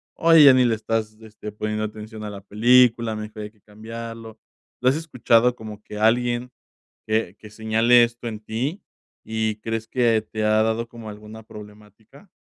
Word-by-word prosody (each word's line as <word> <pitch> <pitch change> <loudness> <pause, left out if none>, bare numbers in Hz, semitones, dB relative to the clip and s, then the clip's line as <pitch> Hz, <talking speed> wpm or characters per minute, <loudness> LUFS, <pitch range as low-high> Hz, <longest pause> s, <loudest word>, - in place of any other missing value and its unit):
"Oye, 165 -2 +6
ya 135 - +9
ni 130 -1 +4
le 115 -2 +2
estás, 110 0 -3
este, 105 -1 -10
poniendo 105 +1 -3
atención 110 0 -9
a 105 - -5
la 100 -1 -9
película, 115 +2 +3
mejor 105 0 -7
hay 105 - -8
que 105 -2 -33
cambiarlo?". 115 +1 -9 0.4
¿Lo 125 - +4
has 135 - +1
escuchado 125 -6 +2
como 105 -2 -10
que 105 - -10
alguien, 120 +3 +1 0.6
que 110 -4 -1
que 110 - -13
señale 110 +3 +3
esto 120 0 -4
en 110 -2 -6
ti, 130 - -4 0.4
y 110 -1 -2
crees 115 +1 -4
que 115 -3 +2
te 110 0 -5
ha 110 0 +3
dado 110 +1 -1
como 115 -2 -10
alguna 105 +1 -11
problemática? 105 - -15
110 Hz, 175 wpm, -22 LUFS, 105-120 Hz, 0.6 s, ya